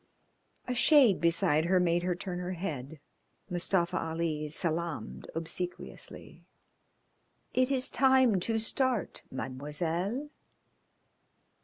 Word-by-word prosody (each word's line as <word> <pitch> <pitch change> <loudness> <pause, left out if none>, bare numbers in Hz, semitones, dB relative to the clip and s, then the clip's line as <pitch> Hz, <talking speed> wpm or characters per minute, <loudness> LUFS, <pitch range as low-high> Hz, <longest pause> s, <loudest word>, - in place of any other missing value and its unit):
A 250 - -1
shade 250 - +5
beside 170 -2 +3
her 185 +1 +3
made 175 -1 +2
her 180 0 0
turn 180 0 -5
her 180 +1 -3
head. 160 -5 -5 0.5
Mustafa 175 0 +1
Ali 160 -2 -2
salaamed 165 +1 -2
obsequiously. 170 +2 -6 1.1
"It 255 0 +3
is 260 -2 +1
time 260 -6 +4
to 225 +5 0
start, 235 -1 0
Mademoiselle." 165 - -3
180 Hz, 100 wpm, -30 LUFS, 165-225 Hz, 1.1 s, shade